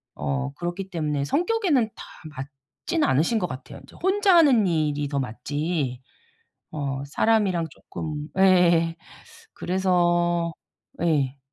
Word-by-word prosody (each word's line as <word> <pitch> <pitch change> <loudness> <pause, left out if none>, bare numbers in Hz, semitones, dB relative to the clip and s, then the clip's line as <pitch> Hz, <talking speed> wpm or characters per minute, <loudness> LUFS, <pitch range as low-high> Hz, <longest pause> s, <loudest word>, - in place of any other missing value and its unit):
어 70 -2 -2
그렇기 175 +2 -5
때문에 150 -4 -1
성격에는 335 - +1
다 - - -9 0.3
맞진 140 - -4
않으신 160 - +2
것 180 - -1
같아요. 130 +1 -9
인제 - - -17
혼자 385 -1 +4
하는 265 - +6
일이 150 -3 0
더 140 -1 -2
맞지 135 +2 -3 0.7
어 140 -3 -3
사람이랑 190 +1 +1
쪼끔 150 +1 -6
예 175 -3 +4 0.6
그래서 175 -2 +1 0.5
예. 140 -5 +1
170 Hz, 230 characters per minute, -24 LUFS, 145-190 Hz, 0.7 s, 하는